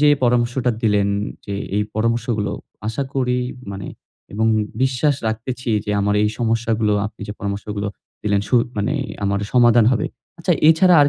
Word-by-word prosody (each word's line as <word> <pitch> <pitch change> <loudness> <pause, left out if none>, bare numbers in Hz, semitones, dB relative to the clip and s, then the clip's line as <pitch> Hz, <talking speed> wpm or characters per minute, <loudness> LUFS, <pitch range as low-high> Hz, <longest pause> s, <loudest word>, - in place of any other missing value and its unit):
যে 150 - +5
এই - - +3
পরামর্শটা 120 +1 +2
দিলেন 105 -2 +3 0.4
যে 100 - -3 0.2
এই 105 - +3
পরামর্শগুলো 115 -1 0 0.3
আশা 115 +5 -1
করি 125 -2 +1 0.3
মানে 100 0 -6 0.5
এবং 110 +2 +1 0.4
বিশ্বাস 135 +2 +2
রাখতেছি 120 +3 -3
যে 105 - -3
আমার 105 +1 +1
এই 105 - +3
সমস্যাগুলো 115 -2 +1
আপনি 110 +1 -12
যে - - -3
পরামর্শগুলো 100 0 -3 0.3
দিলেন 100 -1 +2
সু - - +1 0.2
মানে 105 +7 0 0.3
আমার 100 0 +1
সমাধান 120 -2 +6
হবে। 115 - +1 0.3
আচ্ছা - - +2 0.2
এছাড়া 175 +2 +6
আর 145 - +4
115 Hz, 155 wpm, -21 LUFS, 105-125 Hz, 0.5 s, সমাধান